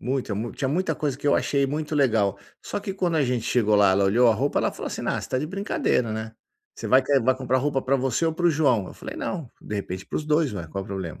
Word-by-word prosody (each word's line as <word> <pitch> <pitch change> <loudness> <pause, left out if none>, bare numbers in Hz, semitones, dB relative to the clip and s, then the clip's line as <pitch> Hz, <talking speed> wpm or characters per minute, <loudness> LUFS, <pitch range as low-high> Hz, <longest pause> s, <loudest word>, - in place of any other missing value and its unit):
Muita 125 -4 -2
mu 115 +3 -3
tinha 135 - -2
muita 180 +6 0
coisa 145 -4 -2
que 145 - -6
eu 145 - +5
achei 140 -1 +1
muito 150 +2 -3
legal. 110 -9 +2 0.2
Só - - -3
que, 195 -1 -4
quando 180 -3 -1
a 145 - +3
gente 125 -2 -1
chegou 110 -4 +2
lá, 100 -2 +5
ela 100 +1 +3
olhou 115 +5 +4
a 110 - +4
roupa, 140 +2 0
ela - - +1
falou - - -7
assim: - - -5
"Ah, - - 0
você - - -8
tá 130 - 0
de 150 - -2
brincadeira, 170 - 0
né, 110 0 -5 0.4
você - - -6
vai 130 - +6
que 140 +1 +2
vai 130 +2 +3
comprar 130 0 0
roupa 140 0 0
pra 135 +2 +1
você 135 +5 0
ou 160 - +1
para 175 - -3
o - - +5
João?". 135 - +2
Eu - - -10
falei: 275 +4 -8
"Não, 190 - -4
de 105 - -6
repente, 95 -1 -5
para - - -5
os 150 - -2
2, 150 -4 +2
ué, 85 -5 -5
qual 100 - -3
o - - -14
problema?". 95 -5 -5
130 Hz, 290 wpm, -25 LUFS, 110-150 Hz, 0.4 s, vai